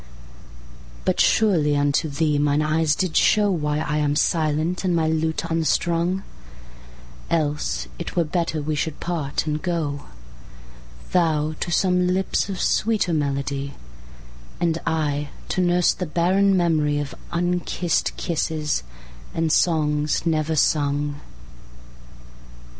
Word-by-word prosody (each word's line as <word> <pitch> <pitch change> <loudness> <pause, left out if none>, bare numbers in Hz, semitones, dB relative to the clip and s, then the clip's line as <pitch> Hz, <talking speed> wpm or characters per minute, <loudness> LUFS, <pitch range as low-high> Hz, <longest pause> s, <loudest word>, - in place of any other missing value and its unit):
But - - +1
surely 165 -10 +3
unto 145 +2 +1
Thee 150 0 +1
mine 145 +1 +2
eyes 155 0 +2
did 185 -1 -1
showWhy 160 -7 +2
I 150 - 0
am 145 -1 +1
silent, 155 +3 0
and 180 -2 +1
my 160 -1 +1
lute 160 0 0
unstrung; 170 +3 +1 1.1
Else 150 - -1
it - - -6
were 175 - +3
better 160 -1 -2
we 155 +1 -1
should 150 0 -2
part, 160 -6 -2
and 150 -1 -2
go, 155 -5 -2 1.1
Thou 155 -3 +2
to 175 - -3
some 180 +1 +2
lips 190 +2 0
of 190 -2 -4
sweeter 215 -6 +1
melody, 140 -1 -2 0.8
And 165 -1 0
I 150 -3 -1 0.2
to 185 - 0
nurse 175 -1 +3
the 180 - -4
barren 190 +5 +2
memoryOf 150 -5 +1 0.2
unkissed 175 0 -1
kisses, 155 - -1 0.5
and 165 -1 0
songs 150 -2 +1
never 160 -1 0
sung. 145 -1 +1
160 Hz, 115 wpm, -23 LUFS, 150-175 Hz, 1.1 s, surely